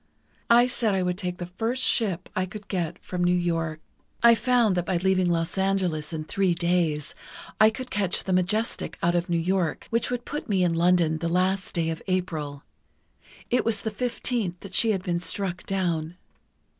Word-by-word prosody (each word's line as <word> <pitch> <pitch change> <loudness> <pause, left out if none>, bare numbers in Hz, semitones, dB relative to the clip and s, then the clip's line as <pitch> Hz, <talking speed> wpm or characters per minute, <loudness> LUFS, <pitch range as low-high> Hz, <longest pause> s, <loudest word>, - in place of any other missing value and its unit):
I 240 +1 +7
said 230 -5 +1
I 190 - +1
would 180 0 0
take 180 -3 -3
the 175 - -5
first 225 +8 -2
ship 190 -6 +1
I 185 0 0
could 205 +2 -10
get 175 -3 -2
from 180 -1 -2
New 175 0 +3
York. 165 -3 -1 0.4
"I 235 0 +9
found 235 -4 +2
that 175 -1 0
by 185 - +1
leaving 185 0 +2
Los 170 +2 0
Angeles 185 -6 0
in 160 -1 -4
three 185 +2 +1
days, 170 -4 0 0.5
I 215 - +7
could 250 +3 -7
catch 195 -4 0
the 190 - -1
Majestic 195 +5 -1
out 170 0 +3
of 175 +1 0
New 170 - +2
York, 175 0 0
which 230 0 +1
would 245 -1 -3
put 295 -4 -5
me 190 -3 +2
in 175 -2 +2
London 170 -2 +3
the 170 +1 -1
last 185 +2 0
day 165 -1 0
of 160 - -5
April. 160 -6 -2 0.9
It 250 - +3
was 220 -3 -1
the 220 - -2
15th 225 -5 -2
that 195 -1 -10
she 225 - +4
had 195 -4 0
been 175 -2 -1
struck 180 +1 -2
down. 175 -3 -1
180 Hz, 195 wpm, -26 LUFS, 170-205 Hz, 0.9 s, I